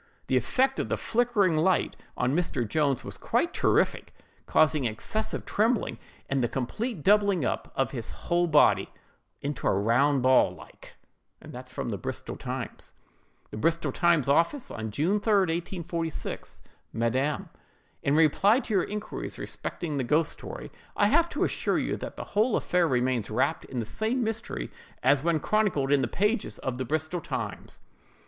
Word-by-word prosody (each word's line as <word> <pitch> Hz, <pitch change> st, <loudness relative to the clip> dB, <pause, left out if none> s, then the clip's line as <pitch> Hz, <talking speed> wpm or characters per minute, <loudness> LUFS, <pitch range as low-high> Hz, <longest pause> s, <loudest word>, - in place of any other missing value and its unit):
The 130 Hz, -, 0 dB
effect 260 Hz, -, +2 dB
of -, -, -2 dB
the -, -, 0 dB
'flickering 225 Hz, -7 st, +2 dB
light' 175 Hz, +3 st, +2 dB, 0.2 s
on 125 Hz, +3 st, +1 dB
Mr. 150 Hz, -9 st, 0 dB
Jones 140 Hz, 0 st, +1 dB
was -, -, -8 dB
quite -, -, 0 dB
terrific, -, -, +1 dB, 0.3 s
causing 155 Hz, -3 st, +3 dB
excessive 215 Hz, -, -3 dB
trembling, 225 Hz, +2 st, +1 dB, 0.3 s
and 135 Hz, -2 st, 0 dB
the -, -, +2 dB
complete 180 Hz, -, -3 dB
doubling 200 Hz, -6 st, +4 dB
up -, -, -2 dB
of 135 Hz, -, 0 dB
his 120 Hz, -5 st, -5 dB
whole 175 Hz, 0 st, 0 dB
body 150 Hz, -2 st, +4 dB, 0.5 s
into 140 Hz, -1 st, -3 dB
a -, -, +4 dB
round 125 Hz, +6 st, +3 dB
ball, 130 Hz, 0 st, +4 dB
like."—Bristol 125 Hz, -6 st, -8 dB
Times. -, -, -6 dB, 0.6 s
"BRISTOL 165 Hz, +9 st, 0 dB
TIMES 170 Hz, -6 st, +2 dB
OFFICE, 170 Hz, -, +2 dB, 0.2 s
June 165 Hz, -, +1 dB
3, 220 Hz, -, -1 dB, 0.5 s
1846. 165 Hz, -2 st, -4 dB, 0.3 s
"MADAM: 130 Hz, +6 st, 0 dB, 0.5 s
In 140 Hz, -, +1 dB
reply 190 Hz, -, +4 dB
to 230 Hz, -, -5 dB
your 190 Hz, -3 st, +3 dB
inquiries 210 Hz, +1 st, -5 dB
respecting 155 Hz, -5 st, -4 dB
the 135 Hz, -, 0 dB
ghost 150 Hz, +5 st, +2 dB
story, -, -, -8 dB, 0.3 s
I 205 Hz, -, +4 dB
have 335 Hz, +5 st, +4 dB
to -, -, -1 dB
assure -, -, 0 dB
you -, -, -1 dB
that -, -, -7 dB
the -, -, -4 dB
whole 220 Hz, +3 st, +3 dB
affair 180 Hz, -1 st, +2 dB
remains 125 Hz, -4 st, 0 dB
wrapped 110 Hz, +4 st, 0 dB
in 130 Hz, -, -7 dB
the 115 Hz, -, -1 dB
same 225 Hz, -, -1 dB
mystery 220 Hz, -, -4 dB, 0.3 s
as 135 Hz, +2 st, +4 dB
when 165 Hz, -2 st, +2 dB
chronicled 185 Hz, -9 st, +1 dB
in 145 Hz, -1 st, +4 dB
the -, -, 0 dB
pages 210 Hz, +3 st, 0 dB
of 130 Hz, -1 st, -4 dB
the 130 Hz, -, -1 dB
Bristol 155 Hz, +5 st, -2 dB
Times. -, -, -5 dB
155 Hz, 150 wpm, -27 LUFS, 130-205 Hz, 0.6 s, doubling